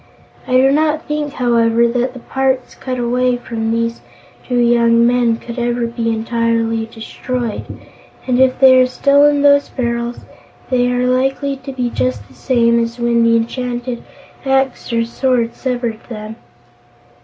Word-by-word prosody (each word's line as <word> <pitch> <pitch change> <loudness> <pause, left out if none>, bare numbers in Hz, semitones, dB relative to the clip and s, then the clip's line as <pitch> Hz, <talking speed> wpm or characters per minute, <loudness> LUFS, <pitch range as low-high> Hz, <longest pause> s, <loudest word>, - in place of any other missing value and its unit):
I - - -2
do 260 +1 +5
not 310 +2 +1
think, 300 -1 -3
however, 235 -2 +2
that 245 +2 -1
the 255 - -9
parts 265 -1 -1
cut 255 -1 -5
away 245 +1 0
from 225 -2 -4
these 230 +1 -1 0.5
two 250 - -1
young 235 -1 +4
men 240 -1 +2
could 235 +1 -8
ever 240 0 -1
be 230 0 -3
entirely 230 0 -1
destroyed 235 +1 -5 0.6
and, 250 -1 +1
if 260 -1 +3
they 260 -1 +7
are 255 - +3
still 280 +3 +3
in 290 -1 +3
those 285 0 +4
barrels, 235 -1 -3 0.5
they 245 -1 +2
are 250 0 0
likely 270 +2 0
to 265 +1 -8
be 250 -2 -3
just 125 -5 -2
the - - -19
same 235 - +2
as 230 +1 -2
when 235 -1 +1
the 230 0 +4
enchanted 245 +1 -3 0.4
axe 270 -2 0
or 230 0 +1
sword 235 -1 0
severed 240 -4 -3
them." 215 -1 -7
240 Hz, 155 wpm, -16 LUFS, 230-255 Hz, 0.6 s, they